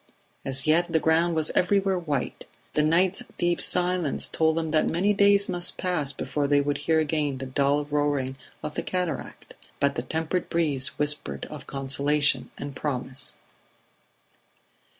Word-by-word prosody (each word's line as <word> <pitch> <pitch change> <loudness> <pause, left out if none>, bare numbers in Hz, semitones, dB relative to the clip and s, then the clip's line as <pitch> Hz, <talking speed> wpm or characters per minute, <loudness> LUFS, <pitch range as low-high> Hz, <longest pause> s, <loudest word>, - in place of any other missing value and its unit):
As 135 0 +3
yet 170 +3 +3
the 160 - +3
ground 165 +2 +2
was 155 -1 +1
everywhere 195 0 +2
white; 150 -6 -3 0.3
the 150 - +2
night's 175 +5 +2 0.2
deep 175 0 +1
silence 180 -4 +2
told 160 0 +1
them 160 -1 -1
that 155 0 +2
many 195 +5 +2
days 200 0 +4
must 175 0 -3
pass 175 -7 -1
before 140 +1 -2
they 145 0 +4
would 145 0 -1
hear 160 +2 +1
again 150 -3 -1
the 135 - -5
dull 140 +2 +1
roaring 145 -3 -1 0.3
of 150 -1 -4
the - - -2
cataract; 180 -5 -4 0.3
but 140 0 +2
the 120 - -3
tempered 160 +7 -2
breeze 150 -6 +2
whispered 150 0 -2
of 150 -3 -9
consolation 140 +2 +1
and 140 0 -7
promise. 130 -2 -4
150 Hz, 150 wpm, -26 LUFS, 140-175 Hz, 0.3 s, days